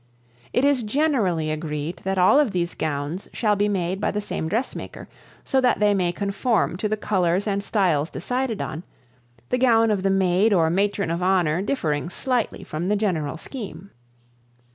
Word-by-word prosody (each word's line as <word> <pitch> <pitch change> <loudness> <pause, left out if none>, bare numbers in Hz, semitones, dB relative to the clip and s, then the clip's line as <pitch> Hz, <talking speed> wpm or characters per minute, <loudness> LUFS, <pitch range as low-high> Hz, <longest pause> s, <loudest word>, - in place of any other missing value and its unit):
It 250 - +2
is 285 -3 +3
generally 215 - +1
agreed 155 +1 -4
that 190 0 -1
all 185 +10 +5
of 280 -9 +2
these 175 -1 -1
gowns 155 +4 -3
shall 210 -3 +1
be 205 +1 +1
made 190 -1 -1
by - - +1
the 210 - -2
same 205 -5 -4
dressmaker 230 +8 -4 0.4
so 265 - +2
that 250 -1 +2
they 210 -1 +4
may 180 -3 +1
conform 200 +2 0
to 210 +2 -2
the 215 - 0
colors 185 -2 +1
and 200 -1 -1
styles 175 -8 +1
decided 250 -3 -2
on, 155 - -5 0.7
the 250 - +1
gown 225 -3 +4
of 200 -3 0
the 195 - +1
maid 195 +2 +3
or 165 -4 +3
matron 200 -1 0
of 170 +1 -2
honor 180 -3 +2
differing 170 - -1
slightly 250 +4 -2
from 155 +4 -4
the 210 - +2
general 175 -9 -1
scheme. 200 - -8
195 Hz, 175 wpm, -23 LUFS, 170-220 Hz, 0.7 s, all